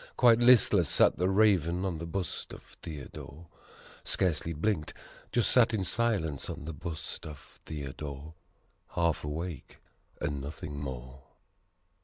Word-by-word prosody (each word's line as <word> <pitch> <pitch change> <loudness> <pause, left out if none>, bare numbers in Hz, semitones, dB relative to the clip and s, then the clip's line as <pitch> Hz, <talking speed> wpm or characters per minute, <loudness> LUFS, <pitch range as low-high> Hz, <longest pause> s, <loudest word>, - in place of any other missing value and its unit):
Quite 120 -2 +6
listless 110 - +6
sat - - +4
the 90 +2 +2
Raven 95 -3 +3
on 90 -4 -2
the 85 - -5
bust 90 0 -4
of - - -10 0.2
Theodore. 75 +1 -8 0.6
Scarcely 85 -2 0
blinked 80 0 -1 0.4
just 120 - +3
sat 120 -2 +5
in 100 - 0
silence 95 - 0
on - - -6
the 80 - -5
bust 80 +1 -6
of 75 -2 -11
Theodore: 70 0 -6 0.6
Half 85 -2 +1
awake 80 0 -5 0.4
and 70 -2 -2
nothing 70 +1 -6
more. 65 -1 -7
80 Hz, 130 wpm, -30 LUFS, 75-95 Hz, 0.6 s, Quite